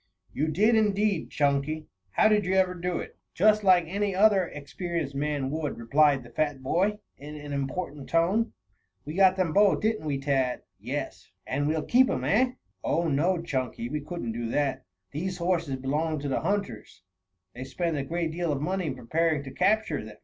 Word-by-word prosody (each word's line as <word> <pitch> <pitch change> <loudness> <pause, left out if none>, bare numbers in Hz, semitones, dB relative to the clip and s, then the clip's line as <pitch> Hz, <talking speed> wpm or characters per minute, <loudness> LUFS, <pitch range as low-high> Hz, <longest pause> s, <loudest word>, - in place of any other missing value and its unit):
"You 155 - 0
did, 205 +9 +3
indeed, 210 -4 +1
Chunky. 145 +2 0 0.3
How 215 - +5
did 210 -1 +3
you 185 +1 0
ever 185 -1 +3
do 180 -1 -2
it?" - - -7 0.2
"Just 215 +3 +4
like 185 -3 +6
any 200 +3 -1
other 195 -2 +4
experienced 160 0 -4
man 140 -1 -1
would," 155 -2 -3
replied 140 +3 +3
the 120 - -14
fat 145 +1 -1
boy, 195 +9 +1 0.2
in 150 +2 -9
an 145 -1 -7
important 140 +1 -4
tone. 185 +8 +2 0.5
"We 150 - -5
got 190 +1 +5
them 185 -4 0
both, 205 0 +4
didn't 215 -7 0
we, 140 -2 0
Tad!" 135 -3 0 0.2
"Yes." - - -5 0.2
"And 145 +2 -1
we'll 155 0 0
keep 255 +2 +4
'em, - - -1
eh!" 250 +5 +2 0.3
"Oh, 170 0 +1
no, 170 +5 +1
Chunky. 130 -6 -3
We 150 +2 -3
couldn't 150 -6 -5
do 115 0 -4
that. 140 +2 -1 0.3
These 180 +5 -3
horses 170 -6 0
belong 150 +5 -1
to 145 - -3
the 135 - -1
hunters. 160 - -3 0.5
They 125 - -7
spend 165 +4 -2
a 140 - -1
great 165 +3 -2
deal 170 0 -1
of 140 - -1
money 185 +3 -1
in 135 - -3
preparing 155 +4 0
to 135 - -8
capture 215 - +1
them. 105 0 -11
160 Hz, 185 wpm, -27 LUFS, 140-185 Hz, 0.5 s, like